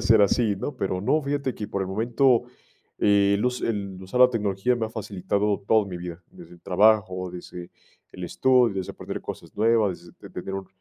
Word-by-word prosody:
ser 110 0 +5
así, 105 +1 +2
¿no? 145 +9 -4
Pero 95 -4 -2
no, 150 +9 +2
fíjate 140 -3 -2
que, 105 - -6
por 100 - -2
el 95 - -4
momento, 120 +5 +2 0.5
eh, 100 -1 +4
el 105 - -2
us 125 0 0
el 100 -4 -3
usar 95 +7 -2
la 125 0 +8
tecnología 105 +1 0
me 115 -2 -1
ha - - -10
facilitado 100 -1 -2
todo 110 -1 +5
en 100 - -8
mi 90 - -5
vida, 85 0 -8
desde 175 - -14
el 85 - -20
trabajo, 95 -2 +2
desde 90 0 -9 0.4
el 90 - -7
estudio, 125 +2 +3
desde 95 - -4
aprender - - -6
cosas - - -9
nuevas, 105 -6 +1
desde - - -12
tener 95 - -5
un 95 -1 -5
105 Hz, 205 wpm, -25 LUFS, 95-115 Hz, 0.5 s, la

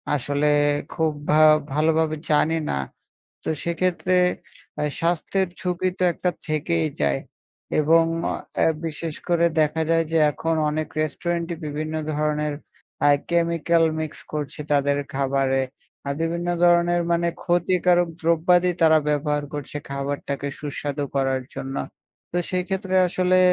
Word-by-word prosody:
আসলে 145 +2 0 0.5
খুব 160 -1 +1 0.2
ভা 155 +1 +5 0.3
ভালোভাবে 155 +1 +2
জানি 155 +2 +3
না। 70 - 0 0.7
তো - - -3
সেক্ষেত্রে 180 +2 0 0.7
আ - - +1 0.2
স্বাস্থ্যের 175 +3 0
ঝুকি 180 0 0
তো - - +1
একটা 180 - -1 0.2
থেকেই 160 +1 0
যায় 70 -2 +2 0.6
এবং 165 +2 +5 0.6
আ - - +4 0.2
বিশেষ 160 0 -4
করে 170 0 +3 0.2
দেখা 155 +1 +1
যায় 165 0 +3
যে 165 - +2
এখন 165 +2 -1
অনেক 155 +1 -2
রেস্টুরেন্টই 170 +2 -2
বিভিন্ন 155 +2 -3 0.2
ধরনের 150 0 0 0.5
আ - - +7 0.2
কেমিক্যাল 170 -1 +2 0.2
মিক্স 155 -1 -5
করছে 150 -1 -4
তাদের 140 0 +2 0.2
খাবারে। 135 -1 +1 0.5
আ - - +1
বিভিন্ন 170 +1 -2 0.2
ধরনের 175 0 +4
মানে 170 0 +2 0.2
ক্ষতিকারক 175 0 +2
দ্রব্যাদি 175 +2 +3
তারা 160 -1 +6
ব্যবহার 150 0 0
করছে 145 0 -5
খাবারটাকে 140 0 -3
সুস্বাদু 145 0 -3
করার 135 -1 +1
জন্য। 135 0 -5 0.6
তো 175 - -1
সেক্ষেত্রে 190 +1 -1
আসলে 185 +1 +2
160 Hz, 125 wpm, -23 LUFS, 150-175 Hz, 0.7 s, আ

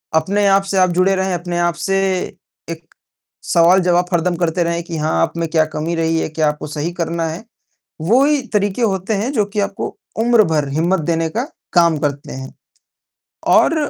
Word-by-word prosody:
अपने 200 +6 +1
आप 195 0 +4
से 195 0 -2
आप 185 -1 +4
जुड़े 185 +2 +2
रहें, 190 0 -1
अपने 175 0 -3
आप 175 0 +1
से 195 +2 -1 0.7
एक 165 0 -7 0.6
सवाल-जवाब 175 +1 +3
हरदम 175 +1 +1
करते 170 0 0
रहें 170 0 -2
कि 170 -1 -6
हाँ 155 0 -1
आप - - 0
में 165 - -1
क्या 160 -1 +2
कमी 165 +3 -2
रही 165 0 0
है, - - -2
क्या 155 0 0
आपको 150 0 -5
सही 150 +3 -3
करना 170 -1 -2
है। 165 +7 -7 0.6
वो 235 - +3
ही 295 -1 +2
तरीके 205 +3 0
होते 195 -1 0
हैं 225 +7 -2
जो 220 -7 +2
कि 205 +1 -3
आपको 200 0 -4 0.3
उम्र 235 -2 +5
भर 150 -3 +1
हिम्मत 170 +5 +1
देने 165 -1 0
का 240 - 0 0.3
काम 170 -3 +4
करते 145 -1 -3
हैं। 130 0 -8 1.1
और - - +3
175 Hz, 190 wpm, -18 LUFS, 160-195 Hz, 1.1 s, उम्र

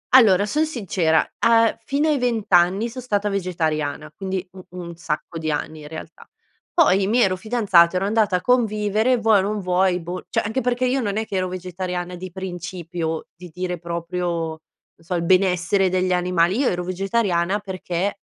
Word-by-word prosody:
Allora, 205 -6 +6
son 305 +9 0
sincera, 185 - +1
a 230 -1 +4
fino 285 +5 +1
ai 300 -3 +2
20 235 -4 0
anni 185 +6 +4
son 255 +2 -7
stata 210 -4 -1
vegetariana, 155 -6 -2
quindi, 190 -1 -4
un 185 - -11
un 175 -1 -8
sacco 165 0 -4
di 160 -1 -3
anni, 155 +1 -3
in 150 - -9
realtà. 160 +1 -10 0.4
Poi, 195 - +4
mi 230 +4 +2
ero 195 -6 +3
fidanzata, 190 -5 +3
ero 185 +1 +1
andata 210 -2 +2
a 180 - 0
convivere, 220 +1 +2
vuoi 220 -3 +4
o - - +2
non 205 +2 -2
vuoi, 180 0 +1
boh 175 +2 -6
cioè - - +1
anche 220 +5 -2
perché 245 +1 0
io 255 +2 +1
non 205 -3 -2
è 220 - -1
che 200 - -6
ero 185 - 0
vegetariana 180 0 -5
di 185 0 -8
principio, 175 -3 -5
di 180 +1 -11
dire 180 +1 -4
proprio, 170 +1 -3 0.2
non 160 0 -8 0.4
so 170 +2 -4
il 170 - -1
benessere 185 +1 +3
degli 185 0 +1
animali, 180 +1 +2
io 280 - +2
ero 180 0 -2
vegetariana 190 0 0
perché 190 0 -3
185 Hz, 185 wpm, -22 LUFS, 175-215 Hz, 0.4 s, Allora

